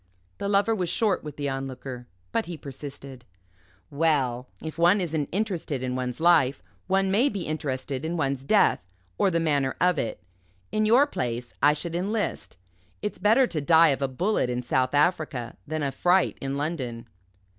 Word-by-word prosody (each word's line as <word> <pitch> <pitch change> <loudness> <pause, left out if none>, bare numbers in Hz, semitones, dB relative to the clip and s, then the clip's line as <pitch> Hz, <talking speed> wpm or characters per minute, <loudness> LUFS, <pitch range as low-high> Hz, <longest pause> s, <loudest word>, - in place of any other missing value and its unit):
The 200 - -2
Lover 200 +2 +3
was 180 -5 -1
short 210 -1 +1
with 150 -2 -8
the 145 -1 -2
Onlooker; 130 -2 -5 0.2
but 230 - -1
he 175 -2 -6
persisted. 135 -2 -9 0.7
"Well, 140 -5 +1
if 160 0 -7
one 175 +4 +5
isn't 160 -5 -2
interested 175 - -2
in 125 0 -2
one's 125 0 -3
life, 145 - +4 0.2
one 195 0 +2
may 235 +8 +3
be 200 -6 -4
interested 140 -3 -3
in 165 +2 -2
one's 140 -3 -1
death 210 +9 +4 0.4
or 195 - +4
the 170 -2 +1
manner 145 -5 +1
of 180 -4 +3
it. 115 - -3 0.5
In 215 0 +1
your 245 +6 +6
place, 120 - -4
I 145 +1 +6
should 165 +3 -5
enlist. 195 - -2 0.5
It's 210 - -3
better 225 +7 +5
to 160 -10 -3
die 160 +2 +6
of 135 -1 0
a 135 - +1
bullet 170 +2 0
in 125 0 -2
South 130 +2 +1
Africa 145 -6 0
than 155 0 -2
of 140 -1 -1
fright 180 +6 +2
in 135 0 -3
London." 130 -7 -3
150 Hz, 175 wpm, -26 LUFS, 130-180 Hz, 0.7 s, your